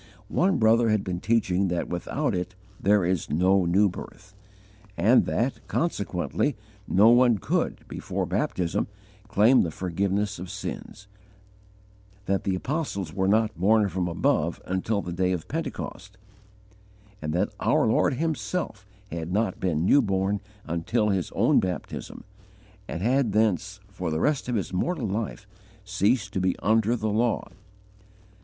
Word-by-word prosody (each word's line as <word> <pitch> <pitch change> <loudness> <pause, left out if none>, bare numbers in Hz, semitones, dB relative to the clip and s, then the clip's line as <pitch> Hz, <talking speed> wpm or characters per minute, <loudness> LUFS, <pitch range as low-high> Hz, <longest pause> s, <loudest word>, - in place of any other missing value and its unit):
One 190 +2 +2
brother 115 0 +4
had 105 -2 +2
been 90 -1 -3
teaching 100 -3 +1
that 90 -1 -1
without 120 - -2
it 90 0 -3 0.2
there 100 -1 +3
is 90 -2 -1
no 90 +5 +3
new 95 +5 +4
birth, 95 +1 -9 0.6
and 110 +9 +5
that, 125 +4 0
consequently, 105 - -1 0.3
no 105 +5 +5
one 120 -1 +5
could, - - -2
before - - -3
baptism, 90 +3 -1 0.4
claim 110 +5 +5
the 85 - 0
forgiveness 95 +4 -2
of 90 0 -7
sins; 100 - -7 1.2
that 100 0 -1
the 95 - +1
apostles 100 - -3
were 95 -1 0
not 110 +2 +2
born 105 +4 +3
from 90 -1 -2
above 85 - 0
until 100 +3 -1
the 90 - -5
day 90 +1 +1
of 85 -3 -4
Pentecost, - - -5 1.0
and 75 - -3
that 90 +4 0
our - - +2
Lord - - +2
Himself 155 - -3 0.2
had 85 0 -4
not 105 0 0
been 85 -3 0
new 140 - +5
born 100 -2 0 0.2
until 95 +7 0
His 95 -3 0
own - - +4
baptism, 90 -1 -5 0.6
and 85 - -4
had 125 -2 +2
thence, 105 -1 +1
for 90 -3 -5
the 80 0 -1
rest 145 - 0
of 120 - 0
His 100 -3 -2
mortal 125 - -1
life, 105 +3 -3 0.4
ceased 105 0 +1
to 95 - -1
be 95 -1 +1
under 110 +3 +2
the 110 -2 -2
law! 115 +2 0
100 Hz, 145 wpm, -26 LUFS, 90-110 Hz, 1.2 s, and